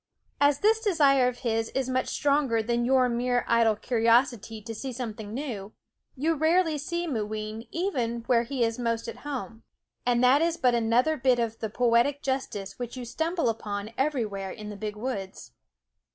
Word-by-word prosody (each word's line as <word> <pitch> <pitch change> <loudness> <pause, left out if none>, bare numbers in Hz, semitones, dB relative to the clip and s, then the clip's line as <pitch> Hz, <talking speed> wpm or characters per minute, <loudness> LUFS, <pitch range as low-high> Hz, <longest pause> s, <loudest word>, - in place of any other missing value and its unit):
As 285 0 +3
this 440 +2 +4
desire 285 - +4
of 250 -1 -4
his 225 -1 0
is 265 -1 0
much 255 0 0
stronger 280 -6 +1
than 235 +1 0
your 255 0 +4
mere 245 +1 0
idle 230 -2 +4
curiosity 230 0 +1
to 225 +2 -7
see 260 +4 -5
something 220 -4 -6
new, 220 -6 -5 0.4
you 310 +5 +1
rarely 320 0 +2
see 340 +4 -3
Mooween 215 -4 -4
even 250 -10 -2
where 235 0 +3
he 245 +1 -1
is 230 +1 -1
most 230 -1 -1
at 230 0 -6
home. 250 -4 -6 0.4
And 245 0 +2
that 260 +4 +5
is 335 0 +1
but 250 -4 +3
another 240 +7 +2
bit 255 -1 +3
of 230 -1 -2
the 220 - -3
poetic 245 +6 +2
justice 250 -8 -3
which 245 +1 -5
you 250 - -5
stumble 330 +7 -1
upon 210 -2 -3
everywhere 225 -9 -1
in 210 +2 -8
the 210 - -7
big 210 0 -5
woods. 210 -4 -5
245 Hz, 175 wpm, -27 LUFS, 225-275 Hz, 0.4 s, that